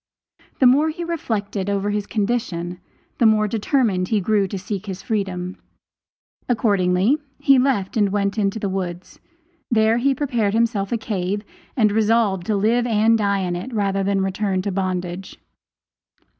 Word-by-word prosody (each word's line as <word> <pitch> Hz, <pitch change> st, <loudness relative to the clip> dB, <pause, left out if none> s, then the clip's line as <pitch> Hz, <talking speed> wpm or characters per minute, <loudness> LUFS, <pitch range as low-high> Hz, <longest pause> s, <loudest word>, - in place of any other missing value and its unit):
The 265 Hz, -, +3 dB
more 285 Hz, +5 st, +5 dB
he 330 Hz, +2 st, -5 dB
reflected 210 Hz, -, -3 dB
over 200 Hz, 0 st, 0 dB
his 205 Hz, -1 st, -2 dB
condition 200 Hz, -6 st, -2 dB, 0.4 s
the 235 Hz, -, +6 dB
more 215 Hz, -1 st, +3 dB
determined 210 Hz, -3 st, 0 dB
he 215 Hz, 0 st, +1 dB
grew 200 Hz, 0 st, +1 dB
to 195 Hz, -, -5 dB
seek 195 Hz, +1 st, -5 dB
his 190 Hz, -1 st, -6 dB
freedom. 190 Hz, -4 st, -3 dB, 0.9 s
Accordingly 205 Hz, +2 st, +2 dB, 0.2 s
he 275 Hz, -1 st, +4 dB
left 250 Hz, -8 st, 0 dB
and 205 Hz, -3 st, +3 dB
went 200 Hz, 0 st, 0 dB
to 205 Hz, -1 st, -1 dB
the 205 Hz, -, -2 dB
woods; 185 Hz, -2 st, -5 dB, 0.5 s
there 225 Hz, 0 st, +3 dB
he 270 Hz, +2 st, +2 dB
prepared 240 Hz, -7 st, 0 dB
himself 225 Hz, -4 st, 0 dB
a 235 Hz, -, +1 dB
cave 205 Hz, -2 st, -3 dB, 0.3 s
and 215 Hz, -4 st, +4 dB
resolved 215 Hz, -4 st, +1 dB
to 215 Hz, -, +1 dB
live 230 Hz, +4 st, +2 dB
and 225 Hz, 0 st, +3 dB
die 200 Hz, -2 st, +1 dB
in 180 Hz, -1 st, -2 dB
it 185 Hz, +9 st, -6 dB
rather 195 Hz, -2 st, 0 dB
than 195 Hz, 0 st, +1 dB
return 190 Hz, 0 st, -1 dB
to 200 Hz, -, -2 dB
bondage. 185 Hz, -1 st, -3 dB
205 Hz, 155 wpm, -21 LUFS, 190-230 Hz, 0.9 s, the